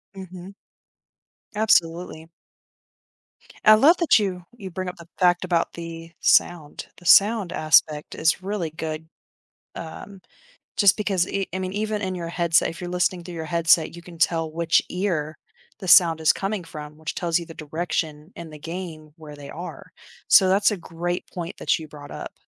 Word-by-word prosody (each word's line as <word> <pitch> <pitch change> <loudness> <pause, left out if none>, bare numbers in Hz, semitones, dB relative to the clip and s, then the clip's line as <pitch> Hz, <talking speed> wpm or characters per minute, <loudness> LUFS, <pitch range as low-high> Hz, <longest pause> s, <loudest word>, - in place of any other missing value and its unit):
Mhm. 185 0 -10 1.0
Absolutely. 170 -6 +1 1.4
I 215 - +9
love 295 +11 +5
that 330 -8 +4
you 185 -4 -3
you 200 -5 -8
bring 185 +1 -5
up - - -10
the 170 -1 -13
fact 180 0 +3
about 170 -2 0
the 165 -1 -8
sound. 160 -4 +1
The 175 - -17
sound 205 +1 +5
aspect 155 -1 +2
is 160 +4 +1
really 190 -4 -3
good, 160 0 -6 0.7
um, 185 +4 -9 0.5
just 200 -2 +5
because 195 -4 0
e 195 -1 -2
I 190 - -2
mean, 185 0 -4
even 215 0 -2
in 185 -1 -2
your 170 -1 -5
headset, 170 0 +2
if 165 - -9
you're 175 - -5
listening 180 0 0
through 175 - -9
your 160 -1 -5
headset, 165 0 +2
you 170 - -10
can 170 -1 -13
tell 165 -1 +1
which 165 0 +2
ear 170 -5 -2 0.4
the 190 - -7
sound 165 -2 +6
is 155 - +4
coming 195 -1 -3
from, 150 -2 -10
which 160 0 -6
tells 170 -1 0
you 170 - -7
the 165 - -11
direction 155 +1 -4
in 170 -1 -9
the 150 - -11
game 165 -2 -7
where 150 -3 -11
they 145 -1 -11
are. 175 +3 -9 0.4
So 190 - +7
that's 200 +3 +3
a 205 - -2
great 175 +1 -4
point 175 -1 -6
that - - +1
you 155 - -9
brought 145 -1 -12
up. - - -7
170 Hz, 175 wpm, -23 LUFS, 160-185 Hz, 1.4 s, I